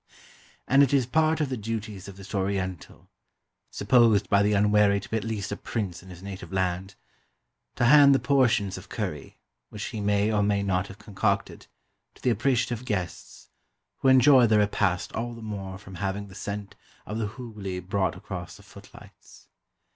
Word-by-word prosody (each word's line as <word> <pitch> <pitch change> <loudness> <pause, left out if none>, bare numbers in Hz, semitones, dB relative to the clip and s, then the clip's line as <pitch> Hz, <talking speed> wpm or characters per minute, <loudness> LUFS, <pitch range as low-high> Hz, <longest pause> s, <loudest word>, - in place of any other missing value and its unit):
And 135 +2 +5
it 140 0 +4
is 130 -3 +3
part 160 +5 +2
of 145 - 0
the 130 - -3
duties 105 -3 -5
of 100 -1 -10
this 100 +2 -11
Oriental 95 -3 -3 0.6
supposed 115 -6 +3
by 100 0 +5
the 105 +1 +2
unwary 105 0 +4
to 100 - -10
be - - -3
at 110 - -1
least 110 -3 -4
a - - -1
prince 100 -6 -4
in 95 - -15
his 90 0 -11
native 95 -4 -8
land 95 +1 -2 0.8
to 120 - +1
hand 140 +1 +7
the - - +2
portions 125 -7 +2
of - - -16
curry, - - -5 0.3
which - - -7
he 110 - -5
may 105 +1 +1
or 105 - +2
may 100 -1 +1
not 95 -1 0
have 95 - -11
concocted, 105 -2 -2 0.5
to - - -20
the 125 - +3
appreciative 120 +1 0
guests, 90 - -5 0.5
who - - -1
enjoy 130 -1 +7
the 110 -1 +4
repast 100 -3 0
all 120 +1 -4
the 115 - -11
more 95 -3 -6
from 95 -1 -13
having 100 +2 -4
the - - -13
scent 100 +1 -6 0.3
of 110 +2 -4
the 110 - -1
Hooghly 105 -7 -6
brought 95 +1 -1
across - - -8
the - - -17
footlights. - - -16
105 Hz, 180 wpm, -26 LUFS, 95-115 Hz, 0.8 s, hand